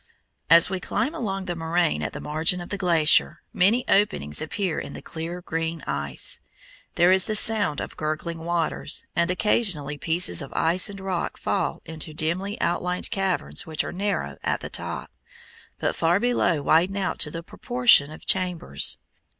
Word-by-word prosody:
As 165 +1 +8
we 190 0 -3
climb 270 - -2
along 195 -4 -4
the 175 -1 -3
moraine 165 0 0
at - - -3
the - - -7
margin 160 +4 0
of 175 - -8
the 200 - -3
glacier, 165 -3 +4
many 220 +7 +2
openings 75 - +1
appear 175 +1 -2
in - - -7
the - - -8
clear 170 +2 -6
green 165 -1 -4
ice. 70 0 -1 0.5
There 175 +1 +4
is 190 0 +3
the 215 - -2
sound 210 -8 +4
of - - -7
gurgling 155 +2 -4
waters, 170 0 -2
and 170 +1 +1
occasionally 180 -7 +1
pieces 170 +2 +2
of 140 - -8
ice 175 +5 +3
and 200 -1 -9
rock 190 -2 -3
fall - - -2
into 155 -1 -5
dimly 185 +6 -1
outlined 180 +1 -1
caverns 185 - -1
which 155 -1 -1
are - - -5
narrow 200 +2 -3
at - - -2
the - - -7
top, - - -5 0.7
but - - -1
far 170 +3 +2
below 190 -10 +1
widen 180 +7 +2
out 190 -2 -2
to 150 - +2
the 165 +2 -7
proportion 240 - +3
of 155 - -12
chambers. 180 - +1
175 Hz, 170 wpm, -24 LUFS, 160-190 Hz, 0.7 s, As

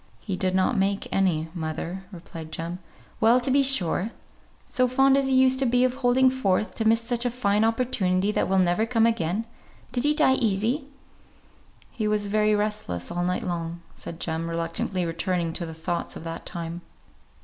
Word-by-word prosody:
"He 195 - -4
did 185 0 -1
not 190 +7 +2
make 195 +1 0
any, 165 -5 +1
mother," 170 +3 -5
replied 165 -3 -9
Jem. 170 +3 -5 0.4
"Well, 230 +3 +5
to 255 +2 -1
be 280 +1 +5
sure! 215 -7 +2 0.6
So 255 0 +1
fond 270 +2 +4
as 275 -1 +2
he 265 - +2
used 260 0 +4
to 270 - +2
be 245 +1 +3
of 255 -1 +2
holding 260 0 +3
forth, 215 -5 0
to 225 - -3
miss 225 +1 +4
such 235 0 -1
a 245 - +1
fine 215 -4 +1
opportunity 210 -5 +1
that - - 0
will 190 - +2
never 185 +4 +2
come 225 -1 +3
again! 220 -1 0 0.5
Did 245 - -1
he 295 +1 +3
die 300 -4 +4
easy?" 230 +5 0 1.0
"He 220 -4 -2
was 210 -1 0
very 215 0 +3
restless 205 - -2
all 175 - -2
night 180 +1 -1
long," 170 -1 -4
said 165 - -9
Jem, 165 0 -3
reluctantly 170 +2 -2
returning 170 0 -1
to 170 -1 -3
the 160 - -7
thoughts 170 +2 -3
of - - -8
that 165 0 -6
time. 170 0 -5
200 Hz, 185 wpm, -25 LUFS, 170-245 Hz, 1.0 s, Well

